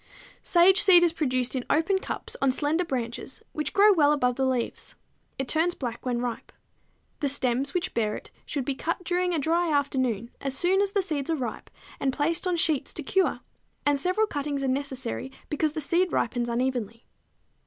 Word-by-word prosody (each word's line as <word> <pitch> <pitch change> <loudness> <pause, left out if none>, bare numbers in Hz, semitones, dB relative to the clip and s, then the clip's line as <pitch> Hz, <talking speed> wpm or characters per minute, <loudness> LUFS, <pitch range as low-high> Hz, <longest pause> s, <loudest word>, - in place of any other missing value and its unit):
Sage 370 +3 +5
seed 365 -4 +7
is 340 -2 +3
produced 255 -5 -1
in 255 - -1
open 345 +5 +2
cups - - -5
on 275 -1 +4
slender 300 +6 0
branches, 250 -4 -4
which 305 - -3
grow 410 +1 +6
well 295 -5 +4
above 250 -4 +2
the 265 +1 +1
leaves. 250 -3 -2 0.4
It 270 - -3
turns 330 +5 +1
black 240 -1 -5
when 245 -1 0
ripe. 245 -2 -4 0.7
The 285 - 0
stems 270 +1 -1
which 360 +1 -1
bear 215 -2 0
it - - -10 0.2
should 280 -4 -3
be 275 - 0
cut 335 +6 -3
during 360 +1 0
a 340 - 0
dry 330 +3 +1
afternoon 260 -6 0
as 270 -1 -2
soon 370 +6 +3
as 400 -1 0
the 400 -2 +2
seeds 300 -5 -3
are 325 - +2
ripe 250 -6 -5 0.3
and 270 - +1
placed 330 +6 0
on 355 -1 +1
sheets 315 -4 +1
to 310 - -3
cure; 380 +7 +1 0.4
and 290 -1 +3
several 370 +8 +2
cuttings 285 -6 -3
are - - 0
necessary, 265 -1 -3 0.2
because 300 0 0
the 315 - -3
seed 345 +4 +1
ripens 240 0 0
unevenly. 235 -2 -2
285 Hz, 190 wpm, -26 LUFS, 255-345 Hz, 0.7 s, seed